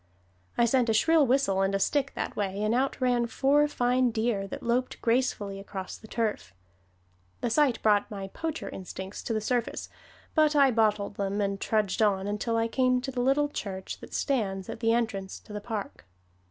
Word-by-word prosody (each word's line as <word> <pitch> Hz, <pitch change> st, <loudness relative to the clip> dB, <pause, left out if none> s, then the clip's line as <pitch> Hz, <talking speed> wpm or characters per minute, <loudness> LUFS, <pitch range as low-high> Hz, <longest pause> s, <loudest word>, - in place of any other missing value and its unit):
I 235 Hz, -, +5 dB
sent 245 Hz, 0 st, +2 dB
a 220 Hz, -, +3 dB
shrill 315 Hz, +4 st, +4 dB
whistle 245 Hz, -7 st, +2 dB
and 195 Hz, 0 st, +1 dB
a -, -, +1 dB
stick 275 Hz, +6 st, +1 dB
that -, -, -3 dB
way, 200 Hz, 0 st, -2 dB
and 215 Hz, +1 st, +1 dB
out 265 Hz, +3 st, 0 dB
ran 245 Hz, -2 st, +2 dB
four 285 Hz, +4 st, +3 dB
fine 250 Hz, -2 st, +2 dB
deer 220 Hz, -3 st, -1 dB
that -, -, -7 dB
loped 245 Hz, +2 st, 0 dB
gracefully 230 Hz, -5 st, 0 dB
across 195 Hz, -1 st, -6 dB
the 220 Hz, -, -13 dB
turf. 215 Hz, -, -2 dB, 0.9 s
The 240 Hz, -, -1 dB
sight 270 Hz, -2 st, +3 dB
brought 210 Hz, -2 st, +3 dB
my 195 Hz, -2 st, -6 dB
poacher 320 Hz, +8 st, -4 dB
instincts 190 Hz, +1 st, -7 dB
to 230 Hz, -, -3 dB
the 215 Hz, -, +1 dB
surface, 240 Hz, +1 st, -2 dB, 0.4 s
but 310 Hz, -1 st, +3 dB
I 275 Hz, -2 st, +6 dB
bottled 210 Hz, -3 st, +1 dB
them, 200 Hz, +1 st, -1 dB
and 200 Hz, -1 st, -1 dB
trudged 215 Hz, -2 st, 0 dB
on 195 Hz, -3 st, +2 dB
until 210 Hz, +3 st, -1 dB
I 225 Hz, 0 st, +2 dB
came 255 Hz, +1 st, +2 dB
to 270 Hz, +2 st, -5 dB
the 250 Hz, -1 st, -2 dB
little 275 Hz, +3 st, +3 dB
church 190 Hz, -8 st, -5 dB
that -, -, -9 dB
stands 195 Hz, -9 st, -1 dB
at -, -, -6 dB
the 225 Hz, -1 st, +2 dB
entrance 220 Hz, -5 st, -1 dB
to 210 Hz, -, -12 dB
the 210 Hz, -, -4 dB
park. 205 Hz, -, -6 dB
225 Hz, 195 wpm, -28 LUFS, 200-255 Hz, 0.9 s, I